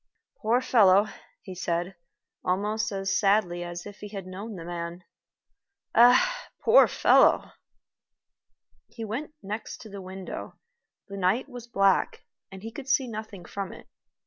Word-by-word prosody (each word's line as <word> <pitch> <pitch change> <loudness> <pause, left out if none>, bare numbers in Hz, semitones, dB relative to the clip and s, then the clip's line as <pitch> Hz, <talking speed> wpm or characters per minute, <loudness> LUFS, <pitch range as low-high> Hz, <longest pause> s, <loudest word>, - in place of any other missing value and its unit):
"Poor 235 +3 +2
fellow," 205 -5 +5 0.4
he 190 - -8
said, 175 +1 -2 0.5
almost 210 +4 0
as 195 -1 -1
sadly 195 -4 +2
as 175 0 -7
if 205 -1 -10
he 210 - -7
had 200 -2 -7
known 200 +4 -7
the 165 -2 -8
man. 170 +1 -6 0.9
"Ah! - - +5 0.2
poor 475 +2 +7
fellow!" - - +4 1.4
He 225 - -7
went 285 +8 -5
next 210 +3 -5
to 220 - -11
the 200 -1 -8
window. 190 0 -7 0.5
The 200 - -7
night 195 +8 +1
was 245 -3 -10
black, 195 -4 +2 0.3
and 190 0 -10
he 225 - -6
could 270 +3 -8
see 270 -2 +2
nothing 215 -4 -7
from 200 -2 -5
it. - - -13
200 Hz, 145 wpm, -27 LUFS, 185-230 Hz, 1.4 s, poor